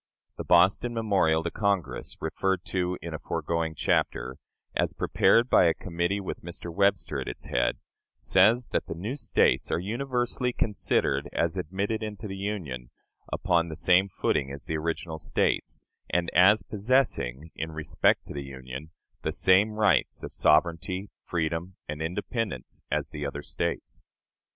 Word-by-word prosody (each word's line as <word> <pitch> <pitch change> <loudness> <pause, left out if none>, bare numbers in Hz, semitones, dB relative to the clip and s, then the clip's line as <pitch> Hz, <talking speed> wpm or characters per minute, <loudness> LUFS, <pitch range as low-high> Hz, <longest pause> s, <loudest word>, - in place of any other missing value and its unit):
The - - -4
Boston 95 +7 +4
memorial 95 -8 +2
to 85 - -2
Congress, 95 - -1
referred 95 -2 -1
to 90 -1 -1
in 85 -1 -5
a 80 - -4
foregoing 85 -1 -2
chapter, 65 -2 0 0.4
as - - +1
prepared 115 +1 +3
by 95 - +5
a 80 -1 +3
committee 85 +2 -1
with 95 - -5
Mr. 85 0 -7
Webster 85 -7 +1
at - - -6
its - - -6
head, - - +1 0.4
says 110 +6 +4
that - - -1
the - - -4
new 105 +10 -4
States 145 - +2
"are - - +2
universally 120 +5 -1
considered 105 -3 0
as - - 0
admitted 100 +7 -2
into 105 0 -5
the 95 - -5
Union 90 -12 -4 0.4
upon 85 -3 +1
the 80 - -5
same 95 +4 +4
footing 70 -5 0
as 70 +1 -8
the 80 - -2
original 80 0 -3
States, - - 0 0.3
and 85 -1 0
as 95 +4 +6
possessing, 100 - 0
in 80 0 -4
respect 75 -1 +1
to - - -8
the 70 - -4
Union, 65 +2 -8 0.3
the - - -1
same 95 +3 +4
rights 105 -1 +2
of - - -6
sovereignty, 85 +5 +2
freedom, 85 +2 -2
and 75 +1 -5
independence, 95 - -3
as - - -1
the 75 - -6
other 70 +1 -4
States." - - -3
90 Hz, 155 wpm, -27 LUFS, 80-100 Hz, 0.4 s, as